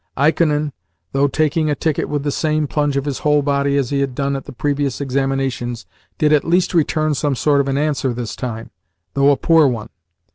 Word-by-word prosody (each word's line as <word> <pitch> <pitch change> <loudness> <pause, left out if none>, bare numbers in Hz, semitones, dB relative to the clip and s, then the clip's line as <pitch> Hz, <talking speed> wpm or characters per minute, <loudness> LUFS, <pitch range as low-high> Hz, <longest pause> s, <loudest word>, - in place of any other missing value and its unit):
Ikonin, 150 0 +2 0.4
though 140 +1 +2
taking 155 +2 0
a 145 - +1
ticket 155 -1 -1
with 145 -1 -2
the 145 - -1
same 155 +1 0
plunge 145 -1 0
of 140 - -1
his 140 -3 -3
whole 150 -1 +2
body 140 0 +1
as 135 -2 -1
he 140 - +1
had 135 -2 -1
done 140 +1 -1
at 135 - -5
the - - -9
previous 140 0 -1
examinations, 135 -3 -2 0.3
did 155 -2 +3
at 150 - +3
least 175 +3 +1
return 155 -2 +1
some 145 -1 0
sort 145 +2 +2
of 140 - -3
an 135 0 0
answer 145 -3 0
this 120 -1 -5
time, 115 -3 -6 0.4
though 140 0 +4
a 140 - +4
poor 165 -3 +4
one. 115 -4 -3
140 Hz, 210 wpm, -19 LUFS, 135-150 Hz, 0.4 s, though